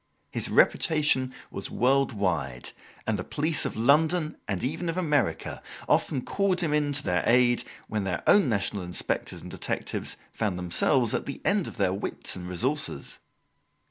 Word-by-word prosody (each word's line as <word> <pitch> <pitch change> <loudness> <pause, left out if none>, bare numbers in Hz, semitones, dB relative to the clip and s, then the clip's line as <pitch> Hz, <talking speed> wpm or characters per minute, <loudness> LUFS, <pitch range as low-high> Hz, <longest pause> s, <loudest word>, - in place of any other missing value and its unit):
His - - -2
reputation 150 -5 +3 0.2
was - - -3
world 135 +3 +2
wide, 90 - -2 0.3
and - - -1
the - - -3
police 155 +1 0
of - - -3
London, 155 +6 +3
and 95 -3 -2
even 160 +6 -2
of 165 - -3
America, 150 - 0 0.3
often 130 -4 +1
called 195 -2 +1
him 160 -4 0
in 150 -1 +1
to 145 - -1
their 90 0 +1
aid 120 0 +4 0.2
when 110 -2 -2
their 90 -3 -3
own 200 -10 +5
national 100 -2 0
inspectors 90 0 -2
and - - -9
detectives - - -3
found 105 -5 -2
themselves 110 - +2
at - - -2
the 140 - -5
end 200 -2 +2
of - - -8
their 95 -2 +1
wits 100 - -3
and 90 -1 -7
resources. 120 - -2
130 Hz, 165 wpm, -27 LUFS, 95-155 Hz, 0.3 s, own